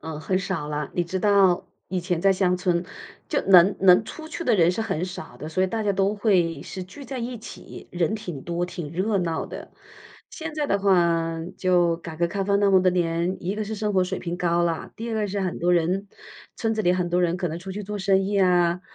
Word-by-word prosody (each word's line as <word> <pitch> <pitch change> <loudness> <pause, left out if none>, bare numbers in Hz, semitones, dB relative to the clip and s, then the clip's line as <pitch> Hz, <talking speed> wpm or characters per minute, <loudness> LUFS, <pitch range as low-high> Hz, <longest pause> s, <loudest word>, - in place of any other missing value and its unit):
嗯， 160 -1 -6
很 185 +3 0
少 185 -6 -3
了。 150 -1 -3
你 175 - +1
知 185 +3 -3
道 195 -2 +3 0.2
以 185 0 -2
前 175 -1 -1
在 195 +2 +4
乡 180 -1 +1
村， 180 -1 0 0.4
就 - - +1
能 190 0 +6
能 190 +2 +6
出 315 +6 -9
去 340 - -5
的 240 - +3
人 175 -4 +4
是 180 - -3
很 180 -6 -2
少 180 -8 -8
的， 150 +5 -7
所 185 +4 0
以 - - +3
大 220 +3 -2
家 205 -1 +1
都 195 +2 +1
会 180 -8 +1
是 190 - -7
聚 275 +10 -12
在 265 0 -6
一 240 0 -4
起， 220 - -11
人 175 +3 0
挺 175 -10 -6
多、 175 +1 -2
挺 175 -4 -6
热 195 +4 0
闹 165 -3 -2
的。 - - -9 0.6
现 320 -1 -6
在 300 -1 -1
的 200 - +1
话， 170 -4 +2 0.2
就 175 -2 +2
改 165 -1 -8
革 170 +1 +1
开 195 +3 -3
放 200 0 +2
那 200 -1 +4
么 190 -1 +6
多 185 - +4
年， 175 0 0
一 185 +3 -2
个 215 0 -3
是 215 +1 -4
生 210 0 -2
活 185 -2 +3
水 185 +1 -3
平 170 0 -4
高 175 -1 +1
了， 165 -2 -2
第 230 +2 -5
二 - - -2
个 215 -1 -1
是 200 +1 -2
很 185 -2 -2
多 175 +1 +2
人 180 +4 +1 0.5
村 225 -1 -1
子 215 - -1
里 175 -2 +3
很 180 -1 0
多 175 +1 +1
人 175 0 +1
可 180 -1 -2
能 165 +1 -5
出 190 +2 -7
去 210 +2 -5
做 205 +1 -5
生 195 0 +2
意 200 +1 0
啊， 180 -2 +3
185 Hz, 265 characters per minute, -24 LUFS, 170-200 Hz, 0.6 s, 能